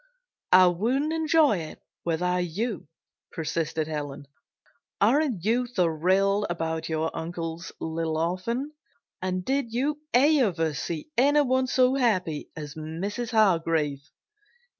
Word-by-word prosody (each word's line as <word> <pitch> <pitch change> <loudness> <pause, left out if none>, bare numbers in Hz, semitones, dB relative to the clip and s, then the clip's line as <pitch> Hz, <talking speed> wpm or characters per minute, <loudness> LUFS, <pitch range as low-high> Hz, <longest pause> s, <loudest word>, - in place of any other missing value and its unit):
"I 185 0 +8
wouldn't 240 - +1
enjoy 315 - +3
it 155 -1 -8 0.2
without 180 +2 0
you," 195 +2 -3 0.4
persisted 160 -1 -2
Helen. 145 -2 -5 0.7
"Aren't 240 - +2
you 240 +3 +2
thrilled 190 +1 +1
about 160 -2 -3
your 160 0 -1
uncle's 165 +1 -5
little 160 0 -2
orphan? 185 - -2 0.5
And 185 -1 -2
did 270 -3 -1
you 280 +5 -1
ever 240 - +3
see 160 - -5
anyone 260 -1 +3
so 255 0 +3
happy 185 - 0
as 150 -2 -6
Mrs. 180 +9 -4
Hargrave?" 165 - +1
185 Hz, 110 wpm, -26 LUFS, 160-245 Hz, 0.7 s, I